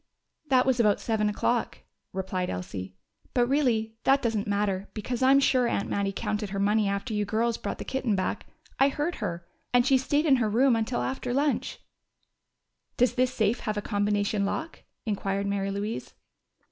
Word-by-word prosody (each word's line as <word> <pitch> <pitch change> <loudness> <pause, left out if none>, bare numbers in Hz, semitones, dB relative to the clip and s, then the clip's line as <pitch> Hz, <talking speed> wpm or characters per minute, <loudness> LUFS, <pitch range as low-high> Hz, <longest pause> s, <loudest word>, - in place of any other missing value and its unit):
"That 255 -2 +4
was 260 -2 +2
about 210 -3 +4
seven 215 -2 0
o'clock," 235 +3 -1 0.3
replied 185 -1 -2
Elsie. 95 +1 -5 0.4
"But 245 -1 +4
really, 240 -6 +1
that 275 +1 +4
doesn't 220 -3 0
matter, 200 -1 -1
because 235 +3 -3
I'm 270 +1 +6
sure 255 -3 +3
Aunt 200 - -1
Mattie 200 -1 0
counted 210 0 -3
her 195 0 -3
money 210 +1 +2
after 200 +4 -3
you 210 0 +1
girls 225 +3 0
brought - - -4
the - - -7
kitten 260 -5 -1
back. 185 - -2 0.3
I 270 - +5
heard 300 +5 -2
her. 175 -6 -4 0.3
And 245 -1 +5
she 265 -1 +4
stayed 290 +4 +1
in 275 -4 +5
her 225 -3 +1
room 245 +3 +4
until 225 +2 -1
after 250 -2 -2
lunch." 285 +1 0 1.2
"Does 245 -1 +3
this 255 0 +1
safe 220 -1 +1
have 215 -2 -3
a - - 0
combination 205 -1 0
lock?" 320 +11 -3 0.2
inquired 200 -2 -1
Mary 200 -1 -1
Louise. 205 +3 -4
220 Hz, 175 wpm, -27 LUFS, 200-255 Hz, 1.2 s, I'm